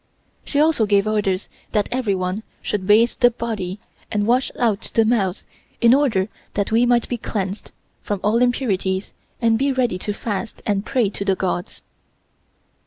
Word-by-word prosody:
She 285 - -1
also 300 -8 +3
gave 200 0 +3
orders 205 -3 0 0.3
that 210 -2 +2
everyone 200 -5 -1 0.2
should 190 -2 -2
bathe 225 +3 +5
the 245 - +6
body 215 -5 -4 0.3
and 205 -1 0
wash 250 +4 +2
out 225 -4 0
the 225 - +5
mouth 205 -5 0 0.3
in 235 0 +6
order 240 -9 +2 0.3
that 200 0 -1
we 235 +2 +4
might 240 -1 +3
be 245 - -3
cleansed 195 -2 -4 0.3
from 205 -2 -3
all 220 +3 +2
impurities 200 -6 0 0.3
and 225 -1 +3
be 275 +1 +2
ready 245 -8 0
to 210 - -3
fast 210 +1 -4
and 200 -2 0
pray 245 -7 +1
to 200 - -4
the 195 -1 +2
Gods. 180 -1 -3
215 Hz, 165 wpm, -21 LUFS, 195-240 Hz, 0.3 s, the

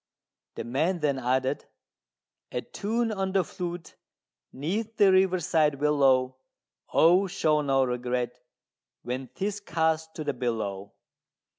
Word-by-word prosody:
The - - -4
man 160 +9 0
then 140 -3 +1
added 130 +2 0 0.9
"A - - -2
tune 225 +2 -2
on 195 -2 -2
the 190 -2 +3
flute 175 0 -6 0.5
'neath 205 +11 -3
the 200 -2 +6
riverside 175 -5 +3
willow: 135 -3 +2 0.5
Oh, 180 +4 +5
show 155 -5 +1
no 135 -2 +2
regret 125 0 -2 0.6
when 125 +2 -4
'tis 200 +6 -3
cast 160 -3 -1
to 155 - -4
the 145 -1 -1
billow!" 105 -5 -3
150 Hz, 120 wpm, -27 LUFS, 130-185 Hz, 0.9 s, the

